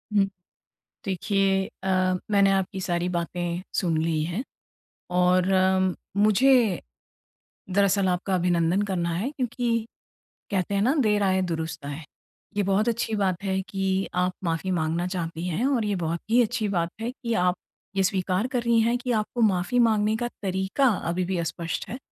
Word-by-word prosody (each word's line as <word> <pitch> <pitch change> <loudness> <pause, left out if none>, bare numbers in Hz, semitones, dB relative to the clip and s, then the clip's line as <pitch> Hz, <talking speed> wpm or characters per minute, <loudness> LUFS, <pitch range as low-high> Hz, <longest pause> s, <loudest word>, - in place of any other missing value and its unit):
हुँ। 200 - +5 0.8
देखिए 195 0 +1 0.2
अ, 190 - -3 0.4
मैंने 200 -1 +5
आपकी 195 0 -1
सारी 175 0 -1
बातें 175 0 -2
सुन 170 -5 +1
ली 160 -1 0
है। 175 +10 -3 0.7
और 180 0 +3 0.7
मुझे, 215 +1 +4 0.9
दरअसल 195 0 +3
आपका 185 +1 0
अभिनंदन 175 +1 +2
करना 170 -2 0
है 205 +11 -1
क्योंकि 240 -4 -1 0.7
कहते 195 +1 0
हैं 200 - +2
ना 255 +6 +3
देर 210 -1 +2
आए, 190 -1 +2
दुरुस्त 160 -4 -3
आए। 145 +3 -6 0.5
ये 205 - +3
बहुत 195 +4 +2
अच्छी 225 -1 -1
बात 195 -2 0
है 190 -1 0
कि 195 0 0
आप 180 0 +1
माफ़ी 170 +2 -1
माँगना 165 0 0
चाहती 170 -2 -4
हैं 180 +9 -1
और 255 -6 +1
ये 205 -1 0
बहुत 170 -1 -2
ही 240 +2 +5
अच्छी 215 -1 0
बात 170 -3 0
है 235 - -2
कि 240 -2 -4
आप 180 0 +2 0.4
ये 195 - +2
स्वीकार 190 +3 0
कर 255 -1 -1
रही 235 -1 +3
हैं 235 +2 +2
कि 245 0 -3
आपको 225 +1 -1
माफ़ी 200 +3 +2
माँगने 220 -2 +3
का 240 +1 -2
तरीका 190 +7 +1 0.2
अभी 180 +2 0
भी 185 0 -2
अस्पष्ट 165 0 -3
है 235 - -4
190 Hz, 165 wpm, -25 LUFS, 175-215 Hz, 0.9 s, हुँ